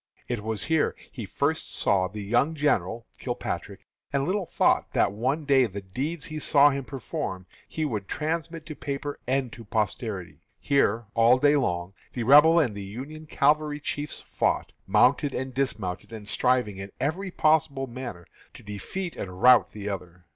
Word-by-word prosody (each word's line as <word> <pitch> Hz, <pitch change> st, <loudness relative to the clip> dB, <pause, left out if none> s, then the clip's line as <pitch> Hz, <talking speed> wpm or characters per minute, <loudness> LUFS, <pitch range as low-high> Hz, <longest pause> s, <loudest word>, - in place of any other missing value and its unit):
It 120 Hz, -3 st, -2 dB
was 110 Hz, -2 st, -3 dB
here 160 Hz, -1 st, +1 dB, 0.2 s
he 115 Hz, -7 st, -7 dB
first 150 Hz, +9 st, -1 dB
saw 95 Hz, -2 st, +2 dB
the 105 Hz, +2 st, -7 dB
young 120 Hz, +10 st, +1 dB
general 120 Hz, -, 0 dB
(Kilpatrick), -, -, -4 dB, 0.3 s
and 140 Hz, -1 st, +1 dB
little 185 Hz, 0 st, -1 dB
thought -, -, +2 dB
that -, -, +3 dB
one 130 Hz, +9 st, -1 dB
day 135 Hz, -3 st, +4 dB
the 100 Hz, -1 st, -7 dB
deeds 140 Hz, -, -4 dB
he 155 Hz, 0 st, -5 dB
saw 145 Hz, -1 st, +5 dB
him 135 Hz, -1 st, -3 dB
perform 95 Hz, -8 st, -5 dB, 0.2 s
he 155 Hz, -, -2 dB
would 105 Hz, -8 st, -3 dB
transmit 165 Hz, +1 st, -3 dB
to 155 Hz, -, -7 dB
paper 140 Hz, 0 st, -4 dB
and 130 Hz, -2 st, 0 dB
to 115 Hz, -, -10 dB
posterity. 105 Hz, -3 st, -3 dB, 0.2 s
Here, 120 Hz, -5 st, +2 dB
all 115 Hz, +2 st, +5 dB
day 145 Hz, +2 st, +4 dB
long, 90 Hz, -9 st, -1 dB, 0.2 s
the 120 Hz, -, -2 dB
Rebel 150 Hz, +7 st, +7 dB
and 130 Hz, -10 st, +1 dB
the 100 Hz, -, -6 dB
Union 135 Hz, +11 st, -8 dB
cavalry 150 Hz, 0 st, +2 dB
chiefs 145 Hz, 0 st, -3 dB
fought, -, -, -1 dB, 0.2 s
mounted 140 Hz, +1 st, +3 dB
and 130 Hz, 0 st, -3 dB
dismounted, 110 Hz, -8 st, -2 dB
and 110 Hz, -2 st, -8 dB
striving 125 Hz, -3 st, +1 dB
in 95 Hz, 0 st, -7 dB
every 170 Hz, +8 st, -1 dB
manner 185 Hz, -, -10 dB
possible 155 Hz, -3 st, +3 dB, 0.7 s
to -, -, -12 dB
defeat 110 Hz, -, -5 dB
and 90 Hz, -1 st, -6 dB
rout 125 Hz, -2 st, +7 dB
the 105 Hz, -1 st, -7 dB
other. 90 Hz, -3 st, -6 dB
130 Hz, 170 wpm, -26 LUFS, 105-150 Hz, 0.7 s, Rebel